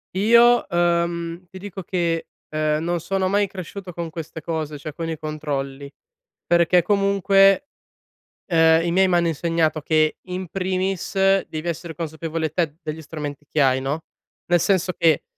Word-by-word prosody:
Io, 235 Hz, +4 st, +5 dB
ehm 170 Hz, 0 st, 0 dB
ti 190 Hz, -, -9 dB
dico 195 Hz, 0 st, -7 dB
che, 170 Hz, -2 st, -1 dB, 0.2 s
ehm, 155 Hz, 0 st, 0 dB
non 175 Hz, +1 st, -1 dB
sono 190 Hz, +3 st, -1 dB
mai 200 Hz, +2 st, +2 dB
cresciuto 185 Hz, 0 st, -8 dB
con 170 Hz, 0 st, -4 dB
queste 160 Hz, 0 st, -7 dB
cose, 155 Hz, -2 st, -4 dB
cioè 155 Hz, +2 st, -6 dB
con 165 Hz, +3 st, -5 dB
i 160 Hz, -2 st, -4 dB
controlli, 145 Hz, -3 st, -4 dB, 0.6 s
perché 175 Hz, +1 st, +4 dB
comunque, 195 Hz, +4 st, +3 dB, 0.8 s
ehm, 165 Hz, -1 st, +5 dB
i 170 Hz, -, 0 dB
miei 190 Hz, +2 st, +4 dB
m'hanno 175 Hz, -2 st, +2 dB
insegnato 165 Hz, 0 st, 0 dB
che 155 Hz, 0 st, +2 dB
in 185 Hz, 0 st, -5 dB
primis, 190 Hz, 0 st, -2 dB, 0.3 s
devi 155 Hz, +2 st, -5 dB
essere 165 Hz, 0 st, -5 dB
consapevole 160 Hz, 0 st, -3 dB
te 155 Hz, -1 st, -1 dB
degli 155 Hz, +1 st, -5 dB
strumenti 150 Hz, -2 st, -7 dB
che 155 Hz, -, +1 dB
hai, 130 Hz, -1 st, +3 dB
no, 140 Hz, +4 st, -3 dB, 0.5 s
nel 175 Hz, 0 st, +4 dB
senso 185 Hz, 0 st, +1 dB
che, 165 Hz, -3 st, +3 dB
170 Hz, 150 wpm, -22 LUFS, 155-185 Hz, 0.8 s, Io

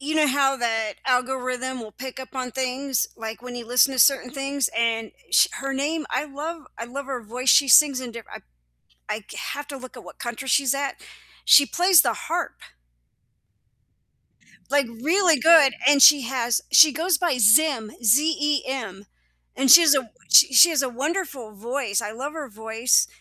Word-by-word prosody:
you 300 Hz, +3 st, -5 dB
know, 305 Hz, -1 st, +3 dB
how 275 Hz, 0 st, 0 dB
that 225 Hz, -3 st, -3 dB
algorithm 255 Hz, 0 st, -3 dB
will 215 Hz, -2 st, -11 dB
pick 260 Hz, +2 st, -10 dB
up 260 Hz, +1 st, -11 dB
on 255 Hz, -1 st, -5 dB
things, 260 Hz, 0 st, -3 dB
like, 225 Hz, 0 st, -8 dB
when 250 Hz, -1 st, -9 dB
you 240 Hz, -1 st, -8 dB
listen 250 Hz, +3 st, +2 dB
to 260 Hz, -, -6 dB
certain 250 Hz, -1 st, +3 dB
things, 275 Hz, -2 st, -3 dB
and 225 Hz, -1 st, -2 dB, 0.2 s
sh -, -, +4 dB
her 275 Hz, 0 st, -6 dB
name 300 Hz, +4 st, -3 dB
I 265 Hz, +4 st, -2 dB
love 305 Hz, +3 st, -8 dB
I 230 Hz, -, -7 dB
love 270 Hz, +3 st, -8 dB
her 255 Hz, -3 st, -6 dB
voice, 250 Hz, +4 st, -6 dB
she 275 Hz, +2 st, +4 dB
sings 275 Hz, 0 st, +5 dB
in 250 Hz, -2 st, -8 dB
diff 230 Hz, -2 st, -11 dB
I -, -, -10 dB, 0.7 s
I 215 Hz, -, -4 dB
c -, -, -11 dB
have 290 Hz, +1 st, -6 dB
to 275 Hz, -2 st, -8 dB
look 255 Hz, 0 st, -13 dB
at 240 Hz, -, -13 dB
what -, -, -15 dB
country 240 Hz, +3 st, -7 dB
she's 275 Hz, 0 st, +1 dB
at. 280 Hz, 0 st, -5 dB, 0.5 s
She 285 Hz, -, +7 dB
plays 355 Hz, 0 st, +3 dB
the -, -, -1 dB
harp -, -, -5 dB, 2.1 s
like, 280 Hz, -2 st, +1 dB, 0.2 s
really 340 Hz, -1 st, +2 dB
good, 315 Hz, -2 st, +5 dB
and 285 Hz, -1 st, +4 dB
she 290 Hz, -3 st, +7 dB
has 240 Hz, -1 st, -2 dB
she 310 Hz, -3 st, +7 dB
goes 330 Hz, +2 st, -1 dB
by 330 Hz, -6 st, -1 dB
Zem, 230 Hz, 0 st, +3 dB
Z-E-M, 270 Hz, -, -1 dB, 0.5 s
and 265 Hz, -1 st, 0 dB
she 335 Hz, +6 st, +10 dB
has 320 Hz, -3 st, +4 dB
a -, -, +2 dB
w 245 Hz, -4 st, -8 dB, 0.2 s
she -, -, +6 dB
she 340 Hz, +8 st, +7 dB
has 305 Hz, -4 st, 0 dB
a 265 Hz, -, -2 dB
wonderful 275 Hz, -, -5 dB
voice, 230 Hz, 0 st, -4 dB
I 205 Hz, -, -7 dB
love 270 Hz, +6 st, -7 dB
her 310 Hz, -3 st, -8 dB
voice, 225 Hz, +2 st, 0 dB
265 Hz, 185 wpm, -22 LUFS, 240-290 Hz, 2.1 s, she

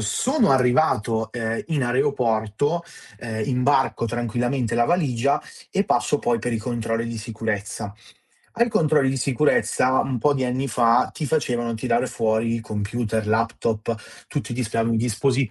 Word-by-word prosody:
sono 220 Hz, -, +1 dB
arrivato, 125 Hz, -4 st, +2 dB
ehm, 115 Hz, -1 st, -2 dB
in 155 Hz, -5 st, 0 dB
aeroporto, 125 Hz, +2 st, 0 dB, 0.4 s
ehm, 110 Hz, -2 st, -4 dB
imbarco 130 Hz, -1 st, +2 dB
tranquillamente 120 Hz, +1 st, -1 dB
la 120 Hz, -, +4 dB
valigia 140 Hz, -5 st, +1 dB, 0.3 s
e 195 Hz, -, +1 dB
passo 120 Hz, +1 st, +1 dB
poi 120 Hz, -3 st, +1 dB
per 120 Hz, +2 st, -3 dB
i 115 Hz, -, 0 dB
controlli 115 Hz, 0 st, -2 dB
di 115 Hz, -1 st, -5 dB
sicurezza. 105 Hz, -2 st, -4 dB, 0.7 s
Ai 235 Hz, -, +4 dB
controlli 150 Hz, -7 st, +3 dB
di 135 Hz, -, -2 dB
sicurezza 130 Hz, -1 st, +2 dB
un 130 Hz, -, -2 dB
po' 145 Hz, +6 st, +3 dB
di 135 Hz, -2 st, -1 dB
anni 130 Hz, +2 st, -1 dB
fa 120 Hz, -1 st, +3 dB
ti 155 Hz, -, -4 dB
facevano 120 Hz, -6 st, 0 dB
tirare 120 Hz, +1 st, 0 dB
fuori 115 Hz, +1 st, 0 dB
i 115 Hz, -, -2 dB
computer, 110 Hz, +1 st, -2 dB
laptop 115 Hz, 0 st, 0 dB, 0.3 s
tutti 145 Hz, -4 st, -4 dB
i -, -, -2 dB
dispia 115 Hz, -2 st, -1 dB
i 115 Hz, 0 st, +1 dB
disposi 125 Hz, +2 st, +1 dB
120 Hz, 150 wpm, -23 LUFS, 115-135 Hz, 0.7 s, la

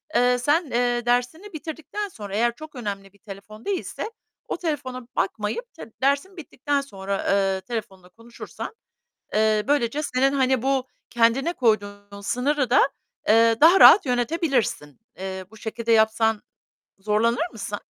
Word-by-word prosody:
eee, 245 Hz, 0 st, +4 dB
sen, 295 Hz, +7 st, +1 dB
eee, 240 Hz, 0 st, 0 dB
dersini 250 Hz, +11 st, -1 dB
bitirdikten 320 Hz, +6 st, -5 dB
sonra 205 Hz, -, -8 dB
eğer 235 Hz, +1 st, +1 dB
çok 310 Hz, -1 st, -11 dB
önemli 200 Hz, -4 st, -6 dB
bir 200 Hz, -, -25 dB
telefon 210 Hz, +2 st, -12 dB
değilse 405 Hz, +3 st, -3 dB, 0.4 s
o -, -, -3 dB
telefona 265 Hz, -7 st, -4 dB
bakmayıp 210 Hz, -, -2 dB
tı 225 Hz, -, -11 dB
dersin 285 Hz, +8 st, 0 dB
bittikten 285 Hz, -2 st, -2 dB
sonra, 195 Hz, -6 st, -5 dB
eee, 195 Hz, -1 st, +1 dB
telefonla 190 Hz, -6 st, -7 dB
konuşursan, 230 Hz, -, -9 dB, 0.6 s
eee, 215 Hz, 0 st, +2 dB
böylece 285 Hz, 0 st, +1 dB
senin, 270 Hz, 0 st, +1 dB
hani, 260 Hz, -3 st, +2 dB
bu 265 Hz, -1 st, 0 dB, 0.2 s
kendine 240 Hz, +8 st, +2 dB
koyduğun 205 Hz, -4 st, -1 dB
sınırı 260 Hz, +5 st, 0 dB
da, 460 Hz, +4 st, +4 dB, 0.4 s
eee, 230 Hz, +1 st, +5 dB
daha 345 Hz, +5 st, +7 dB
rahat 400 Hz, -, +9 dB
yönetebilirsin. 245 Hz, -, -1 dB, 0.2 s
Eee, 190 Hz, 0 st, -6 dB
bu 220 Hz, -, -14 dB
şekilde 230 Hz, +1 st, -3 dB
yapsan 220 Hz, 0 st, +3 dB, 0.6 s
zorlanır 230 Hz, -, +1 dB
mısın? 205 Hz, -1 st, -6 dB
240 Hz, 140 wpm, -24 LUFS, 210-280 Hz, 0.6 s, rahat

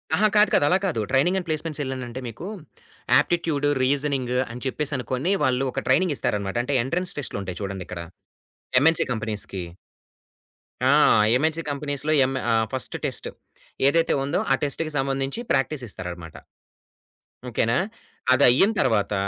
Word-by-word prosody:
ఆహా! 215 Hz, +4 st, +4 dB
కాదు, 210 Hz, 0 st, +6 dB
కాదు, 145 Hz, -, +4 dB
అలా 185 Hz, -, +4 dB
కాదు. 165 Hz, -12 st, -1 dB
ట్రైనింగ్ 160 Hz, +8 st, +3 dB
అండ్ 180 Hz, -, -4 dB
ప్లేస్మెంట్స్‌సెల్ 150 Hz, -3 st, -3 dB
అనంటే 125 Hz, -1 st, -6 dB
మీకు 120 Hz, -, -7 dB, 0.7 s
ఆప్టిట్యూడ్, 165 Hz, -4 st, 0 dB, 0.2 s
రీజనింగ్ 135 Hz, -2 st, 0 dB, 0.2 s
అని 125 Hz, +1 st, -8 dB
చెప్పేసి 145 Hz, +2 st, -2 dB
అనుకొని 130 Hz, +7 st, -2 dB
వాళ్ళు 130 Hz, +1 st, +2 dB
ఒక -, -, -4 dB
ట్రైనింగ్ 150 Hz, +3 st, +3 dB
ఇస్తారన్నమాట. 100 Hz, -2 st, -2 dB
అంటే 140 Hz, +3 st, -1 dB
ఎంట్రన్స్ 180 Hz, +8 st, -2 dB
టెస్ట్‌‌‌‌‌‌‌‌‌‌‌‌‌‌‌‌‌లు 130 Hz, -, -5 dB
ఉంటాయి 90 Hz, 0 st, -6 dB
చూడండిక్కడ 95 Hz, -3 st, -5 dB, 0.8 s
ఎంఎన్సీ 165 Hz, +2 st, +4 dB
కంపెనీస్‌కి. 105 Hz, -4 st, -3 dB, 1.2 s
ఆ! 130 Hz, -, +4 dB, 0.5 s
ఎంఎన్సీ 160 Hz, +3 st, 0 dB
కంపెనీస్‌లో 145 Hz, +1 st, -1 dB
యం 130 Hz, +1 st, +2 dB, 0.2 s
ఆ! -, -, +3 dB, 0.2 s
ఫస్ట్ 130 Hz, -, -2 dB
టెస్ట్ -, -, -2 dB, 0.6 s
ఏదైతే 165 Hz, +3 st, +3 dB
ఉందో, 140 Hz, -, 0 dB
ఆ -, -, +7 dB
టెస్ట్‌కి 155 Hz, +2 st, -1 dB
సంబంధించి 135 Hz, +5 st, -1 dB
ప్రాక్టీస్ 135 Hz, 0 st, 0 dB
ఇస్తారన్నమాట. 90 Hz, -4 st, -6 dB, 1.1 s
ఓకేనా. 115 Hz, +1 st, +1 dB, 0.6 s
అదయిన 130 Hz, -, +5 dB
తరువాత 105 Hz, -2 st, +1 dB
135 Hz, 135 wpm, -24 LUFS, 120-155 Hz, 1.2 s, ఆ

